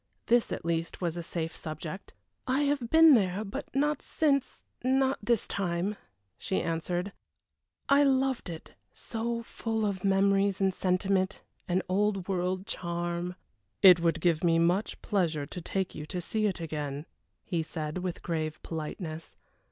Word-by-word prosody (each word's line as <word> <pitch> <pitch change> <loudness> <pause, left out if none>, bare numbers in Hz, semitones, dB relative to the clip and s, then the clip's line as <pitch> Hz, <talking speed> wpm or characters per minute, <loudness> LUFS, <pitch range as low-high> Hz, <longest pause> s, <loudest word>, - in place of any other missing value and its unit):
This, 240 0 +3
at - - -4
least, 165 0 -1
was 170 -2 -1
a 175 - -3
safe 165 -1 -4
subject. 155 +4 -7 0.3
"I 260 +3 +2
have 280 -5 0
been 320 0 +8
there 200 -3 +2
but 200 - -5
not 295 +2 +1
since 280 -4 0 0.2
not 265 +1 +2
this 230 +1 +1
time," 185 +1 -1 0.4
she 190 - -1
answered. 175 +3 -2 0.8
"I 280 +1 +5
loved 265 -5 +2
it: 165 -2 -8 0.2
so 230 +1 -3
full 225 -1 -2
of 195 -3 -2
memories 195 0 +3
and 190 -1 +2
sentiment, 190 +1 0 0.2
and 185 0 +1
Old 195 0 +1
World 185 0 -1
charm." 175 -2 -3 0.5
"It 180 -3 +10
would 165 -1 +1
give 170 -1 +2
me 165 -1 +4
much 175 +5 +1
pleasure 170 -8 0
to 180 - -7
take 190 +2 -2
you 150 0 -7
to 180 - -3
see 215 +5 0
it 190 - -2
again," 150 -3 -4 0.4
he 170 -2 -1
said, 155 +1 -4
with 180 -1 -4
grave 155 -2 -2
politeness. 160 0 -6
185 Hz, 150 wpm, -29 LUFS, 170-215 Hz, 0.8 s, It